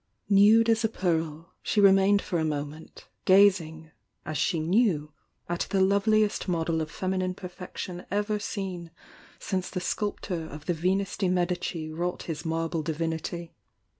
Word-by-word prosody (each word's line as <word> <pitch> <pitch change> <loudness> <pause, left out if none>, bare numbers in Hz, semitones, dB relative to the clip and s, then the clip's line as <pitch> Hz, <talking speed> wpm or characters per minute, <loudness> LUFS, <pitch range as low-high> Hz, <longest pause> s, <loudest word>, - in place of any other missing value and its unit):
Nude 210 +3 +6
as 225 0 +3
a 225 - +2
pearl, 165 -4 -2
she 210 - 0
remained 200 0 +5
for 175 - -1
a - - 0
inoment, 150 0 -5 0.2
gazing, 175 -5 +4 0.3
as 155 - -4
she 160 +3 +1
knew, 165 -4 +1 0.3
at 175 0 -2
the 195 - +1
loveliest 205 +3 +2
model 165 -2 0
of 155 - -4
femmine 185 +1 -2
perfection 180 -1 -7
ever 210 +2 0
seen 190 -5 -5 0.5
since 185 -2 -3
the 185 - -3
sculptor 180 -3 -3
of 150 +1 -10
the 175 - +1
Venus 185 +4 0
de 190 -3 +1
Medici 175 -3 -1
wrought 175 +3 -3
his 160 -2 -5
marble 165 0 -1
divinity. 165 +2 -3
180 Hz, 145 wpm, -27 LUFS, 160-195 Hz, 0.5 s, Nude